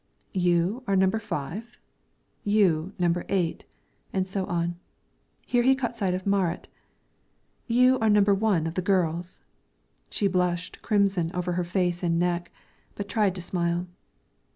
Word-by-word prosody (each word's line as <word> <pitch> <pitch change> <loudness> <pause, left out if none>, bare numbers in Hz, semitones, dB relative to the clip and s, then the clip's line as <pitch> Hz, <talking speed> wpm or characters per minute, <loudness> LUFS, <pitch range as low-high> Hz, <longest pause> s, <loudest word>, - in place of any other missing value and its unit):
"You 180 +5 +1
are 195 - +2
number 190 +3 +3
five; 210 - -5 0.7
you 190 -5 +2
number 175 -1 +1
eight," 180 -4 -1 0.5
and 190 -1 -1
so 190 0 -3
on. 170 0 -2 0.7
Here 245 - +2
he 265 +2 +5
caught 240 -3 -3
sight 190 -5 0
of 185 - -5
Marit. 195 -4 0 1.0
"You 250 +2 +4
are 220 - +2
number 205 -1 +5
one 195 -5 +1
of 165 - -3
the 185 - -1
girls," 175 -2 0 0.7
she 205 - -1
blushed 180 -1 -1
crimson 195 -5 +1
over 180 0 -1
face 175 0 0
and 170 -2 +1
neck, 175 0 0 0.4
but 205 - -5
tried 205 -2 +1
to 180 - -5
smile. 175 0 -1
185 Hz, 140 wpm, -26 LUFS, 175-205 Hz, 1.0 s, he